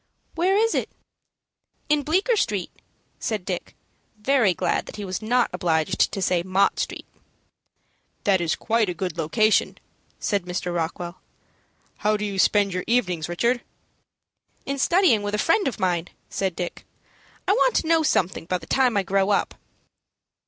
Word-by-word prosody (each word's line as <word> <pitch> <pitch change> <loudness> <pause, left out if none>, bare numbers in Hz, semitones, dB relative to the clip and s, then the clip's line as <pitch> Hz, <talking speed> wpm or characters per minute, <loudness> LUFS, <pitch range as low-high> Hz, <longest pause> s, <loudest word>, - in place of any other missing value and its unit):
"Where 360 +4 +2
is 455 +1 +2
it?" - - -1 1.0
"In 300 -1 +3
Bleecker 375 - +2
Street," 205 - -1 0.5
said 215 -6 -3
Dick, 180 -3 -4 0.4
very 235 -2 +3
glad - - -1
that - - -9
he 205 -1 -5
was 185 +2 -4
not 240 +3 +1
obliged 165 +1 +1
to 195 - -4
say 180 -2 +2
Mott 190 +2 +1
Street. - - -4 1.2
"That 190 -3 +3
is 165 -2 0
quite 225 -3 +1
a 180 - -3
good 180 -1 -3
location," 210 +7 +2 0.4
said 200 -4 -1
Mr. 180 0 -3
Rockwell. 175 +2 -4 0.8
"How 215 +1 +1
do 210 - -3
you 200 -2 -3
spend 200 -1 +3
your 180 0 -2
evenings, 180 -9 0
Richard?" 235 +8 +1 1.0
"In 275 0 -3
studying 340 - +4
with 205 0 -2
a - - -1
friend 390 - +2
of 245 - -3
mine," 175 -3 0 0.2
said 190 -3 -1
Dick. 175 -1 -5 0.6
"I - - +4
want - - +3
to - - +1
know 325 0 +4
something 185 - 0
by 180 +2 0
the 165 - -13
time 250 +2 +2
I 200 - +2
grow 195 +1 +1
up." 200 - +1
205 Hz, 160 wpm, -24 LUFS, 180-250 Hz, 1.2 s, studying